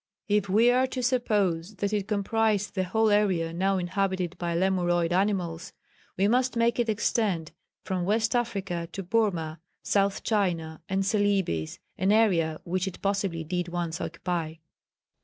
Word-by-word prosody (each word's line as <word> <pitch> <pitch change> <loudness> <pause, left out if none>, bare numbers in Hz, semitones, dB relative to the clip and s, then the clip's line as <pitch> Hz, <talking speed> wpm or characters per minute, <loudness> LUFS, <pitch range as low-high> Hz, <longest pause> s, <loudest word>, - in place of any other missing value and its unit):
If 205 -2 +1
we 225 +5 +5
are 255 +1 +3
to 255 -1 -4
suppose 210 -7 0
that 200 +2 -2
it 205 -2 -1
comprised 210 -1 0
the 185 -1 -1
whole 220 +4 +2
area 185 -6 +2
now 190 +3 +1
inhabited 185 -1 -1
by 170 -1 -2
Lemuroid 175 -2 +1
animals, 185 -3 -1 0.4
we 195 +2 +3
must 250 +3 +2
make 235 +1 +2
it 235 -1 +1
extend 205 -6 0 0.3
from 185 -2 -2
West 220 +5 +1
Africa 195 -8 -2
to 195 - -4
Burmah, 175 -6 0 0.2
South 200 -1 +1
China 170 -7 -1
and 195 0 0
Celebes, 195 - 0 0.2
an 190 +2 +2
area 175 -8 +3
which 185 +2 -1
it 190 - -7
possibly 195 -4 -1
did 180 +2 -2
once 170 -1 -3
occupy." 165 -3 -3
195 Hz, 150 wpm, -27 LUFS, 175-210 Hz, 0.4 s, we